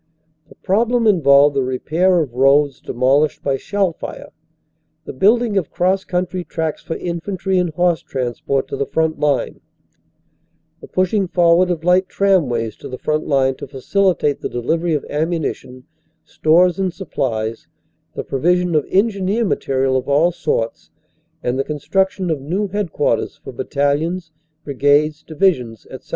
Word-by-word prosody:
The - - -16
problem 230 +4 +1
involved 145 -7 +5
the 135 - +2
repair 160 +8 +1
of 135 -6 -4
roads 135 +2 +3
demolished 135 +5 +1
by 135 -1 0
shell 195 +3 -1
fire; - - -8 0.7
the - - -7
building 210 - +3
of 170 - -6
cross 190 +2 0
coun 180 0 0
try 180 0 -5
tracks 160 -3 -4
for 160 - -5
infantry 185 +2 -2
and 180 -1 0
horse 175 -3 +2
transport 130 +1 -2
to - - -3
the 140 - -2
front 160 -1 -1
line; 145 -1 0 1.2
the - - -12
pushing 185 +1 0
forward 175 +1 +3
of 170 -3 -2
light 180 +1 +3
tramways 130 - +1
to - - -9
the 130 - -6
front 155 +3 -2
line 135 -2 +2
to - - -8
facilitate 150 +3 0
the - - -3
delivery 160 +7 -1
of 145 - -3
ammunition, 150 -5 -3 0.4
stores 175 +3 +3
and 185 -2 -1
supplies; 115 - -3 0.5
the - - -4
provision 175 +5 +1
of 150 -2 +1
engineer 200 +2 +1
material 135 -7 0
of 130 +1 -2
all 155 +5 +3
sorts 150 -9 -3 0.5
and 125 +2 -1
the - - +2
construction 185 +5 -1
of 150 -4 -2
new 185 +9 -2
headquarters 200 -3 -1
for - - -7
battalions, 160 +5 -1 0.3
brigades, 145 +2 +1
divisions, 145 - -1
etc. - - -11
160 Hz, 150 wpm, -19 LUFS, 140-185 Hz, 1.2 s, involved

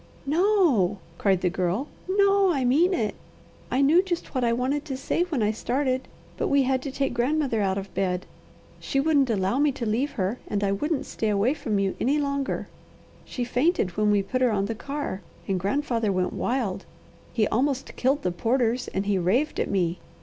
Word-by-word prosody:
"No!" 315 - +3 0.2
cried 190 -3 +2
the 180 - +2
Girl. 185 +9 -1 0.2
"No! 395 -1 +4
I 270 -6 0
mean 310 +9 +4
it! 220 - 0 0.6
I 255 - +1
knew 320 +6 +6
just 360 -3 -4
what 255 -2 0
I 235 - +3
wanted 260 +5 0
to 270 -4 -4
say 275 - -1
when 300 -11 -1
I 210 - +2
started; 260 +3 -1 0.3
but - - 0
we 280 -1 +3
had 260 0 +1
to 275 - -5
take 275 -1 -1
grandmother 250 -1 +1
out 195 -1 +1
of 195 0 -6
bed. 185 -1 -1 0.5
She 275 - -1
wouldn't 280 -3 +3
allow 200 +3 +1
me 295 0 +4
to 240 - -4
leave 235 +7 0
her, 205 -1 -2
and 205 -1 -1
I 195 - +2
wouldn't 290 +8 -1
stay 220 - -2
away 210 +6 +2
from 240 -9 -2
you 195 -1 0
any 275 +5 +2
longer. 280 -1 -2 0.6
She 250 - -4
fainted 245 - +1
when 210 0 +2
we 205 -1 +3
put 255 +6 -2
her 250 - +4
on 200 -3 0
the 225 - -2
car 275 -4 -4 0.3
and 190 -2 0
grandfather 230 +1 0
went 185 -1 0
wild. 235 -7 -1 0.5
He 215 -3 +1
almost 270 +3 -1
killed 270 +3 +1
the 180 - +1
porters, 235 +5 0
and 195 +1 -2
he 200 -2 +1
raved 230 - +1
at - - 0
me. 180 -3 0
250 Hz, 200 wpm, -25 LUFS, 200-280 Hz, 0.6 s, knew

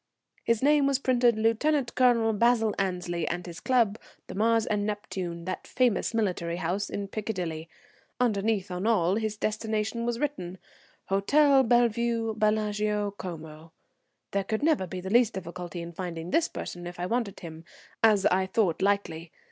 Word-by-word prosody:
His 230 +1 +1
name 290 -1 +4
was 275 -1 +2
printed 245 -3 +2
"Lieut. 240 +5 +1
Col. 235 -3 +3
Basil 225 0 +3
Annesley," 180 -3 -2
and 175 0 -3
his 170 -2 -8
club, 230 -5 +2 0.3
the - - -9
Mars 225 +2 +2
and 210 -1 0
Neptune, 185 -5 -4
that 185 - -5
famous 250 -4 +1
military 185 -7 -1
house 180 +3 -2
in 200 -1 -4
Piccadilly. 180 -6 -4 0.5
Underneath, 210 -4 0
on 180 +4 -2
all, 195 -4 +2
his 215 -1 -2
destination 220 +1 -2
was 240 -1 -1
written, 240 -11 -3 0.5
"Hotel 270 +8 +4
Bellevue, 235 -2 +2
Bellagio, 210 -1 0
Como." 160 -4 -9 0.6
There 200 0 0
could 220 +6 -2
never 300 - +2
be 180 +1 -6
the 190 +1 -5
least 235 0 +4
difficulty 175 -1 -6
in 170 - -7
finding 170 -1 -6
this 330 - +3
person 175 0 -7
if 175 0 -9
I 175 - -1
wanted 225 -1 -2
him, 160 -1 -9 0.4
as 210 -3 +5
I 190 +1 +3
thought 190 -5 +1
likely. 190 -5 0
210 Hz, 155 wpm, -27 LUFS, 180-230 Hz, 0.6 s, as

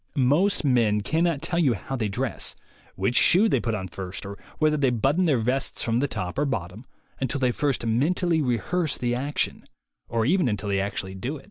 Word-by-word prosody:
Most 150 +8 +2
men 115 -6 +3
cannot 160 +4 0
tell 170 +1 0
you 135 -9 +3
how 135 +7 -5
they 115 -4 -1
dress, 100 - -2 0.4
which 95 +6 -1
shoe 190 - +5
they 135 - +2
put 115 -1 -1
on 95 -2 -4
first, 95 +1 -6
or 100 +1 -6 0.2
whether 155 0 +3
they 140 -3 +2
button 135 - +1
their 150 -6 +3
vests 125 +4 -1
from 115 0 +1
the 140 - +1
top 90 -3 -4
or 145 - +2
bottom, 110 -3 -4 0.3
until 135 +2 -1
they 125 -2 +2
first 140 -1 -1
mentally 160 +8 +1
rehearse 150 +6 0
the 120 -1 -1
action 140 +4 -2 0.5
or 115 -1 0
even 175 +2 +2
until 105 -1 -3
they 100 -1 +1
actually 95 -1 -3
do 125 +11 -4
it. - - -12
125 Hz, 205 wpm, -25 LUFS, 110-150 Hz, 0.5 s, shoe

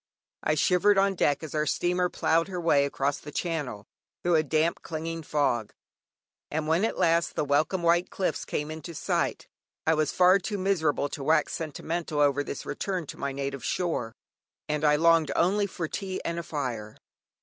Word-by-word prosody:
I 155 - +1
shivered 180 +6 +3
on 195 0 +3
deck, 145 -5 +1
as 155 - -7
our 150 0 0
steamer 180 +3 +1
ploughed 165 +1 +1
her 185 -2 -4
way 150 -4 +3
across 140 0 -1
the 145 - -10
Channel, 145 - -3 0.4
through 175 - +2
a 160 - +5
damp 155 +2 0
clinging 165 0 -4
fog, 140 -8 0 0.8
and 155 0 -2
when 165 +5 +2
at - - -2
last 170 -2 +2
the - - 0
welcome 155 +6 +1
white 170 +1 +3
cliffs 190 - -2
came 150 +1 -3
into 160 +2 -7
sight, - - -1 0.4
I 160 - +4
was 155 -2 +1
far 185 +2 +5
too 205 +2 -3
miserable 170 -7 +1
to 140 - -6
wax 155 +1 +2
sentimental 160 0 -3
over 145 -1 +3
this 140 - -6
return 185 -4 -3
to - - -9
my 140 - -2
native 140 0 -4
shore, 165 -10 -2 0.5
and 150 0 -1
I 150 -1 +5
longed 165 0 +4
only 200 +4 +2
for 175 -3 -4
tea 190 +3 -4
and 170 0 -2
a - - -4
fire. 120 -9 -4
160 Hz, 180 wpm, -27 LUFS, 145-175 Hz, 0.8 s, a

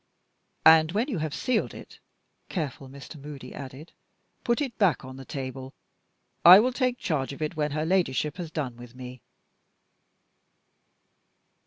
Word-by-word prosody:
"And 160 +1 +7
when 230 +7 0
you 210 - -2
have 155 -1 -2
sealed 245 - -1
it," - - -12 0.5
careful 140 -6 -4
Mr. 140 +2 -11
Moody 145 -1 -9
added, 140 +3 -9 0.5
"put 235 -1 +1
it 270 -5 -3
back 180 -10 +2
on 130 0 -9
the 135 0 -10
table; 130 0 -6 0.7
I 180 +3 +11
will 250 +4 +1
take 250 -1 0
charge 140 - -2
of 140 - -11
it 155 +2 -3
when 150 -1 0
her 155 +2 -2
Ladyship 160 -3 0
has 175 -3 -5
done 135 -7 -4
with 120 0 -12
me." 125 -1 -9
150 Hz, 150 wpm, -27 LUFS, 135-180 Hz, 0.7 s, I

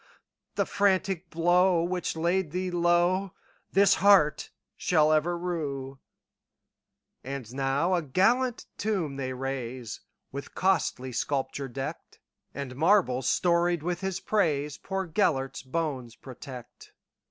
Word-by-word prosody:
The - - +1
frantic 190 -3 +1
blow 175 +1 +3
which 180 -1 -2
laid 170 +1 0
thee 180 +3 -3
lowThis 175 +3 +1
heart 195 -7 +4 0.3
shall 155 -3 +3
ever 160 +3 +2
rue."And 145 -7 -3 1.6
now 140 +6 +1
a 175 - +2
gallant 230 - +1
tomb 185 -10 -1
they 130 -1 -3
raise, 130 -3 -5 0.3
With 140 +1 -8
costly 165 -9 0
sculpture 135 +2 -2
decked; 135 +5 -7 0.3
And 140 -2 -6
marbles 145 - +3
storied 175 -2 +2
with 175 +1 -2
his 190 -1 -2
praisePoor 170 0 -1
Gêlert's 140 -10 +1
bones 130 -4 -3
protect. 130 -2 -11
165 Hz, 105 wpm, -28 LUFS, 135-185 Hz, 1.6 s, heart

